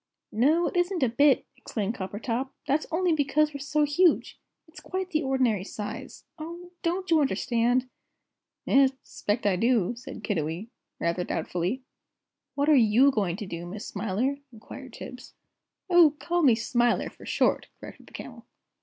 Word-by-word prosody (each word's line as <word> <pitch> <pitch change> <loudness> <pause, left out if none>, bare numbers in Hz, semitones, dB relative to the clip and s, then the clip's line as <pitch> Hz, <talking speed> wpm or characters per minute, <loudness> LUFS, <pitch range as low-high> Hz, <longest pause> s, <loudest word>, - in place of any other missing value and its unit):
"No, 300 +10 +3
it - - -3
isn't 355 -2 +1
a 255 - +3
bit," 275 +4 +4
exclaimed 215 -1 -3
Coppertop; 230 +5 -3 0.2
"that's 290 +3 0
only 340 +1 +1
because 305 0 +2
we're 280 - -5
so 295 +2 +1
huge. 305 +4 +2 0.3
It's 320 +3 -13
quite 375 0 -4
the 310 -2 +1
ordinary 255 - +1
size. 205 +1 -7
Oh, 340 +3 -8
don't 360 +2 -2
you 320 -2 +5
understand?" 245 -2 +1 0.8
"'Es, 270 -1 +4
I - - -32
'spect 210 +2 -3
I 195 -3 +3
do," 230 -1 +2
said 245 - -9
Kiddiwee, 170 +1 -2 0.3
rather 170 +1 0
doubtfully. 180 +10 -2 0.7
"What 285 +1 +1
are 310 - +6 0.2
you 275 +4 +7
going 195 -8 0
to 210 +2 -6
do, 170 -2 -6
Miss 205 +4 -7
Smiler?" 220 +7 -1
inquired 250 +3 -11
Tibbs. 250 0 -10 0.5
"Oh, 345 -5 +6
call 350 0 0
me 260 -7 +6
Smiler, 240 +1 +1
for - - -14
short!" - - +1
corrected - - -12
the - - -18
Camel. - - -9
260 Hz, 160 wpm, -27 LUFS, 215-305 Hz, 0.8 s, you